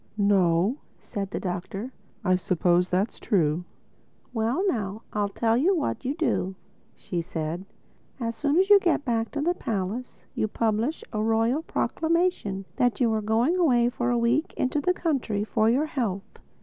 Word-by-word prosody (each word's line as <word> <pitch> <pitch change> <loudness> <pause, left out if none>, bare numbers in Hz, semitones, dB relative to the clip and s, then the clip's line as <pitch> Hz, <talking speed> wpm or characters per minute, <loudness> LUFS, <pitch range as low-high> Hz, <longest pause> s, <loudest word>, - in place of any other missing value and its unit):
"No," 195 - +3 0.2
said 200 -4 -5
the - - -3
Doctor, 195 +6 -4 0.3
"I 185 -1 +4
suppose 180 0 +2
that's 190 +5 0
true." 170 -5 +1 0.7
"Well 230 - 0
now 215 - -2
I 205 -1 +1
tell 225 +3 +1
you 340 +11 +3
what 300 -4 -2
you 270 +3 -1
do," 195 - 0 0.4
said 170 0 -4
she: - - -35
"as 230 0 -2
soon 285 +7 +1
as 385 +2 +3
you 405 - +10
get 345 -6 +1
back 230 -2 0
to 290 - -3
the 345 +4 +2
palace 220 - -4
you 215 - 0
publish 225 +7 -1
a 215 - 0
royal 225 +6 +2
proclamation 325 - 0
that 245 -1 +2
you 235 -3 +3
are 220 - 0
going 230 - +2
away 245 -9 +4
for 245 0 -2
a 240 - +2
week 240 +7 +1
into 265 +3 0
the 360 +4 +1
country 255 - -1
for 220 0 +2
your 265 +6 +2
health. 220 -10 -3
225 Hz, 165 wpm, -26 LUFS, 195-275 Hz, 0.7 s, you